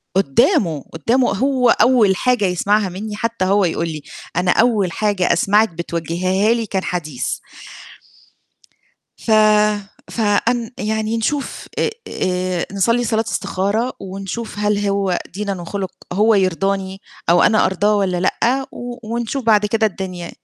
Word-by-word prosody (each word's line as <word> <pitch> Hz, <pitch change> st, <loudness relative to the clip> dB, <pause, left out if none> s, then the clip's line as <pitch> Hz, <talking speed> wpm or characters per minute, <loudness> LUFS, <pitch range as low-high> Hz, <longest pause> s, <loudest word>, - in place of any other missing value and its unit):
قُدّامه، 160 Hz, -2 st, +2 dB
قُدّامه 235 Hz, -, +1 dB
هو 255 Hz, +3 st, +2 dB
أول 235 Hz, -6 st, +4 dB
حاجة 245 Hz, +1 st, +1 dB
يسمعها 200 Hz, +3 st, +1 dB
منّي 205 Hz, +4 st, -6 dB
حتى 230 Hz, -2 st, -2 dB
هو 200 Hz, +1 st, +3 dB
يقُول 170 Hz, 0 st, -1 dB
لي: 155 Hz, -2 st, -5 dB, 0.3 s
"أنا 180 Hz, +1 st, +2 dB
أول 215 Hz, -5 st, +2 dB
حاجة 205 Hz, -2 st, +1 dB
أسمعِك 210 Hz, +5 st, +3 dB
بتوجهيها 170 Hz, +5 st, 0 dB
لي 230 Hz, -1 st, -2 dB
كان 195 Hz, -2 st, -2 dB
حديث." 155 Hz, -8 st, -3 dB, 1.8 s
ف -, -, -6 dB, 0.8 s
فأن 230 Hz, +2 st, 0 dB
يعني 220 Hz, +1 st, -1 dB
نشوف 275 Hz, +5 st, -3 dB, 0.4 s
آآ 180 Hz, -1 st, -2 dB
نصلّي 230 Hz, +5 st, +1 dB
صلاة 225 Hz, 0 st, 0 dB
استخارة 200 Hz, +5 st, -1 dB
ونشوف 195 Hz, +3 st, -6 dB
هل 210 Hz, 0 st, +1 dB
هو 195 Hz, -2 st, 0 dB, 0.2 s
دينًا 200 Hz, -2 st, -3 dB
وخُلُق 190 Hz, +2 st, -4 dB, 0.2 s
هو 215 Hz, +4 st, +3 dB
يرضاني 195 Hz, 0 st, 0 dB, 0.3 s
أو 175 Hz, -, +5 dB
أنا 220 Hz, -2 st, +4 dB
أرضاه 205 Hz, +3 st, +1 dB
والّا 190 Hz, -3 st, 0 dB
لأ، 250 Hz, +8 st, +1 dB
و 245 Hz, 0 st, -7 dB
ونشوف 240 Hz, +3 st, -2 dB
بعد 210 Hz, -2 st, +4 dB
كده 220 Hz, +1 st, +1 dB
الدنيا. 185 Hz, -3 st, -5 dB
200 Hz, 130 wpm, -19 LUFS, 185-225 Hz, 1.8 s, أو